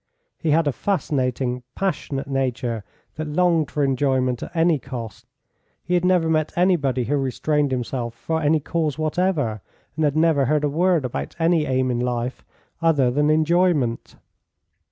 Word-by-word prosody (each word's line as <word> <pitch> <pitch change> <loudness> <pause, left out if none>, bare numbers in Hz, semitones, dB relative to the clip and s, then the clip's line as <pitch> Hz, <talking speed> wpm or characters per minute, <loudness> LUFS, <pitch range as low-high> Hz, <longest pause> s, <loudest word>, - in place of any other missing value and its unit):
He 165 - -1
had 160 +2 +3
a 145 - +2
fascinating, 130 -8 -1
passionate 150 -7 -2
nature, 125 -5 -2 0.3
that 155 0 -3
longed 165 0 +2
for 145 - -1
enjoyment 130 -2 +1
at - - -8
any 165 -2 +3
cost. 120 -6 -8 0.6
He 180 - -3
had 175 -1 +2
never 180 -2 +3
met 155 -1 +1
anybody 150 -9 +2
who 140 +5 0
restrained 145 +2 0
himself 125 -2 -3
for 160 +6 -2
any 155 +1 +3
cause 155 -1 -1
whatever, 155 - 0 0.3
and 160 - -1
had 145 0 +1
never 155 -4 +3
heard 150 +3 +1
a 145 - +2
word 170 0 +2
about 70 - -4
any 165 -2 +2
aim 130 -1 +1
in 120 - -1
life 125 0 -2 0.4
other 145 -7 +3
than 145 +3 +2
enjoyment. 155 -5 +1
145 Hz, 155 wpm, -22 LUFS, 130-165 Hz, 0.6 s, had